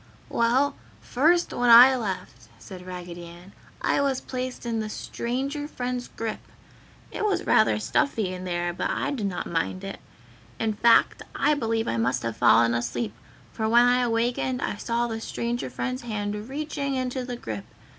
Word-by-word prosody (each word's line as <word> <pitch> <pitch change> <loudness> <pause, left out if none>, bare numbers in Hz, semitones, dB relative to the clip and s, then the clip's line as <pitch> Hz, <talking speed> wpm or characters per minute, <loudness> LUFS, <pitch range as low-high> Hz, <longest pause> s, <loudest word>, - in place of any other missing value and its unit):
"Well, 245 +5 +2 0.2
first 335 +7 +2
when 245 0 +1
I 245 +3 +10
left," 195 -7 -5
said 185 -1 -11
Raggedy 175 -1 -7
Ann, 175 +3 -13 0.3
"I - - +2
was 275 -2 +1
placed 255 -1 -5
in 230 -1 -1
the 215 -1 -3
Stranger 275 +7 -3
Friend's 250 -3 -4
grip. 225 -1 -5 0.7
It - - -4
was 420 -2 0
rather - - +4
stuffy 220 -10 0
in 180 0 -6
there, 175 -1 -2
but - - -2
I - - -1
did 230 -8 -2
not 185 - -3
mind 170 +3 -2
it; 195 0 -6 0.6
in 220 -1 0
fact 230 +2 +4
I 295 +2 +3
believe 225 -5 -1
I 115 - -1
must 125 +2 0
have 115 -1 -3
fallen 115 0 +5
asleep, 120 -2 -2 0.4
for 220 -1 -1
when 240 +2 +6
I 250 +1 +4
awakened 245 +2 0
I - - -2
saw 235 +2 -1
the 225 -1 -4
Stranger 235 +1 -3
Friend's 255 0 -3
hand 210 -1 -4
reaching 280 -1 -3
into 255 0 -2
the 245 0 -5
grip. 110 - -6
230 Hz, 170 wpm, -26 LUFS, 185-255 Hz, 0.7 s, I